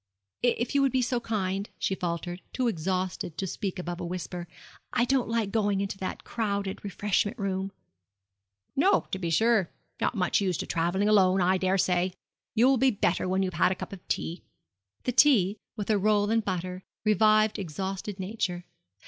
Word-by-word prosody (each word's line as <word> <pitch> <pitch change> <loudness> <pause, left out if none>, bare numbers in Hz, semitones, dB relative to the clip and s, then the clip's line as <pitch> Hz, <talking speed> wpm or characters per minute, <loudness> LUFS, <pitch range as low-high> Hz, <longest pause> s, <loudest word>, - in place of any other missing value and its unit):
'If 240 0 +1
you 280 - +4
would 275 -1 +3
be 255 0 +2
so 245 0 0
kind,' 200 -3 -2
she - - 0
faltered, 175 0 -3
too 255 -2 0
exhausted 185 -3 -2
to 195 - -1
speak 190 +1 -3
above 175 -1 -4
a - - -4
whisper; 180 0 -5 0.5
'I 240 - +3
don't 260 -2 +1
like 225 -3 0
going 205 -3 +1
into 195 0 -3
that 185 - -4
crowded 200 -4 -2
refreshment 205 +2 0
room.' 195 -2 -2 1.0
'No, 370 +9 +4
to 190 - -2
be 170 -3 -2
sure 220 +1 +3 0.3
not - - 0
much 185 0 +2
used 185 -4 0
to - - -4
travelling 175 +5 0
alone, 195 -3 +5
I 185 +1 +3
daresay. 185 -1 +1 0.4
You 235 +2 +5
will 265 0 +5
be 265 +2 +4
better 190 -5 0
when 190 +1 +2
you've 185 -1 -2
had 180 +2 +3
a - - 0
cup 185 - -7
of 185 - -11
tea.' 170 +2 -2 0.6
The 250 - 0
tea, 225 -7 +5 0.2
with 210 -1 -2
a 210 - +3
roll 205 +1 +2
and 225 0 +2
butter, 185 -1 -3 0.2
revived 215 +1 +4
exhausted 190 +3 -4
nature. 185 -3 -3
195 Hz, 180 wpm, -28 LUFS, 185-215 Hz, 1.0 s, alone